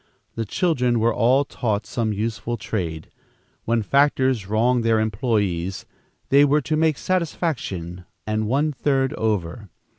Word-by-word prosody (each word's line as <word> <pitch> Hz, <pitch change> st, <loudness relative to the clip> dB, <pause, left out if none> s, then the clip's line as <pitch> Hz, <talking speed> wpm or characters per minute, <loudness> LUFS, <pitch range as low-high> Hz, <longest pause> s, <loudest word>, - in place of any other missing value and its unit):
The 115 Hz, -, -3 dB
children 125 Hz, -, +1 dB
were 115 Hz, +1 st, +2 dB
all 130 Hz, +6 st, +3 dB
taught 105 Hz, -6 st, -2 dB
some 110 Hz, +1 st, -2 dB
useful 110 Hz, +2 st, -3 dB
trade. 80 Hz, -9 st, -4 dB, 0.5 s
When 115 Hz, -1 st, +1 dB
factors 130 Hz, -4 st, +2 dB
wronged 115 Hz, +3 st, +2 dB
their 115 Hz, -1 st, +3 dB
employees, 100 Hz, -5 st, -1 dB, 0.4 s
they 140 Hz, +1 st, +6 dB
were 145 Hz, +1 st, +3 dB
to 155 Hz, +3 st, -1 dB
make 155 Hz, -2 st, +2 dB
satisfaction 120 Hz, -, -2 dB, 0.2 s
and 110 Hz, 0 st, -1 dB
one 145 Hz, +6 st, +1 dB
third 135 Hz, -1 st, 0 dB
over. 105 Hz, -1 st, -2 dB
115 Hz, 130 wpm, -22 LUFS, 105-135 Hz, 0.5 s, they